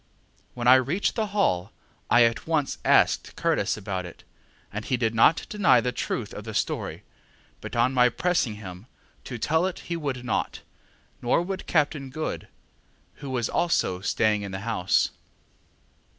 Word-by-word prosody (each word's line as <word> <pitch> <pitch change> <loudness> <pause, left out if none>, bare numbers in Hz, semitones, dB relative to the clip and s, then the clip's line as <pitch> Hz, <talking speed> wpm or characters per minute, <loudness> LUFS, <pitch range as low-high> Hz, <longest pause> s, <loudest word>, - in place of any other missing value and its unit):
When 120 -1 -2
I 130 +1 +9
reached 165 +10 -1
the 220 -2 -1
Hall, 115 - 0 0.4
I 120 0 +6
at 115 +5 0
once 155 -4 0
asked - - +3
Curtis - - 0
about 95 -3 -4
it, 90 -2 -11 0.5
and 105 +1 -4
he 130 - 0
did 115 -2 0
not 115 +8 +4
deny 210 -3 +4
the 125 - -1
truth 120 -3 -3
of 105 - -7
the 110 0 -7
story; - - -2 0.6
but - - -7
on 120 +3 +2
my 125 -1 +5
pressing 140 -5 0
him 95 0 -10 0.4
to 125 - -5
tell 160 +9 +1
it 185 - -5
he - - +1
would 135 -6 -4
not, 115 - -2 0.6
nor 125 +7 +2
would 190 +1 -5
Captain 145 -3 0
Good, 155 +4 -4 0.7
who 140 - -8
was 120 -3 -1
also 165 - 0
staying 105 0 +1
in 100 -1 -6
the 95 0 -5
house. 110 -5 +1
125 Hz, 165 wpm, -26 LUFS, 110-155 Hz, 0.7 s, I